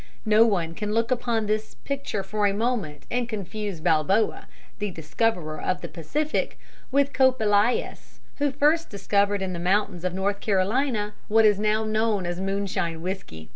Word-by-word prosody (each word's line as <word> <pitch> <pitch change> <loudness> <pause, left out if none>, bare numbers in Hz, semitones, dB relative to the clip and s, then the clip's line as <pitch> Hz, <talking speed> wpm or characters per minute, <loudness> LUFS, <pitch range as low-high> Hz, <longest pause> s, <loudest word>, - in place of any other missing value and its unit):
No 220 +1 +6
one 170 -6 0
can 210 +2 -3
look 230 +2 +1
upon 235 -3 0
this 215 +1 -2
picture 280 -8 -4
for 205 +2 0
a 200 - 0
moment 215 -10 -2
and 245 -1 -1
confuse 210 -3 -4
Balboa, 160 +8 +1 0.3
the 210 -1 -1
discoverer 160 -1 -2
of 185 -1 -1
the - - -5
Pacific, 290 - -2 0.3
with 280 +1 +2
Kope 260 -1 +4
Elias, 210 +2 +1 0.2
who 290 0 +2
first 300 +4 +2
discovered 200 0 +1
in 185 -1 -3
the 170 - -4
mountains 185 0 0
of 185 -1 -1
North 200 +1 -1
Carolina 210 +2 0
what 220 +1 +5
is 205 -2 +4
now 215 +1 +1
known 215 -3 0
as 175 0 -3
moonshine 190 -4 -2
whiskey. 175 - -6
210 Hz, 165 wpm, -25 LUFS, 185-225 Hz, 0.3 s, No